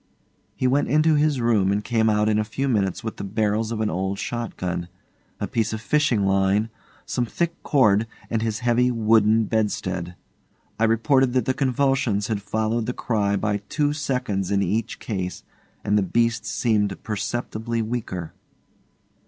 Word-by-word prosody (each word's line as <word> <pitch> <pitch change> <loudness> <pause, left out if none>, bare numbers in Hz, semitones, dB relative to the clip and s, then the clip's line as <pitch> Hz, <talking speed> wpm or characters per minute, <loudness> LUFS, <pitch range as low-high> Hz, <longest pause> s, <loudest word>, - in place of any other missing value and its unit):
He - - -2
went 135 +3 +2
into 155 +2 +3
his 150 -2 +2
room 110 -5 +2
and 105 +1 0
came 110 -1 +2
out 105 0 +2
in 105 0 +2
a - - +2
few 125 +6 -3
minutes 100 -7 0
with 110 - -5
the - - -5
barrels 110 +2 0
of 110 -1 -2
an 110 - +1
old 95 +3 -2
shot 120 +2 -4
gun, 90 -1 -3 0.5
a - - -1
piece 110 -1 -1
of 110 - -3
fishing 120 -4 +1
line, 95 +3 +2 0.4
some 120 -1 -1
thick 170 +6 -2
cord, 110 -6 +3 0.2
and 115 -1 -1
his 110 0 -2
heavy 120 +1 +3
wooden 110 -1 +3
bedstead. 95 -5 -2 0.6
I 115 - +4
reported 125 +3 +3
that 130 -3 +1
the 130 - +1
convulsions 130 -6 +1
had 105 -2 -1
followed 110 +2 -1
the 125 - -1
cry 105 -5 0
by 105 0 0
two 145 -1 +1
seconds 125 - -2
in 100 -1 +2
each 105 +5 -1
case, 95 -4 -4 0.4
and 105 +1 +2
the - - +2
beast 110 +2 0
seemed 105 -4 0
perceptibly 115 +1 -3
weaker. 110 -8 -4
110 Hz, 170 wpm, -23 LUFS, 100-120 Hz, 0.6 s, I